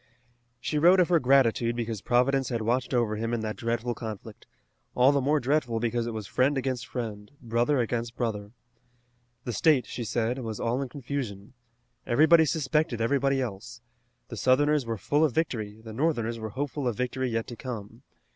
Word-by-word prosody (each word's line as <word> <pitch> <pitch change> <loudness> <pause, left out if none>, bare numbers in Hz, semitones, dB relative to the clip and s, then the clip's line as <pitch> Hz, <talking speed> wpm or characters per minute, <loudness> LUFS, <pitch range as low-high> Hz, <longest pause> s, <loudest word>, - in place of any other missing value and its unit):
She 150 +6 -1
wrote 180 +4 +6
of 180 - +3
her 170 -2 +4
gratitude 125 -3 +3
because 115 -4 -3
Providence 125 +4 +2
had 115 -3 -2
watched 120 +3 0
over 120 -4 +1
him 115 +2 -1
in 115 - -3
that 110 -1 -3
dreadful 120 +1 -2
conflict, 110 -4 -8 0.5
all 125 +2 +5
the 140 -1 +1
more 145 +3 +2
dreadful 130 -4 0
because 120 0 -1
it - - -2
was 110 -2 -5
friend 130 +7 +1
against 130 -2 -2
friend, 105 -4 -5
brother 120 +4 +1
against 120 0 -2
brother. 105 -4 -3 0.9
The 120 - -4
state, 150 0 +3
she 120 - -5
said, 120 +3 -1
was 110 -4 -5
all 120 +3 0
in 135 - -4
confusion. 120 -6 -5 0.5
Everybody 160 +6 +5
suspected 150 -3 0
everybody 135 +3 +1
else. 120 +1 -6 0.5
The 115 - -7
Southerners 145 +2 +3
were 115 -1 -2
full 145 - +1
of 150 -7 +1
victory, 110 -9 -2
the 110 -1 -8
Northerners 115 -4 -1
were 110 0 -5
hopeful 140 +3 -3
of 120 - -1
victory 125 +1 -1
yet 115 -1 -1
to 120 - -8
come. 115 -2 -7
120 Hz, 180 wpm, -27 LUFS, 115-135 Hz, 0.9 s, wrote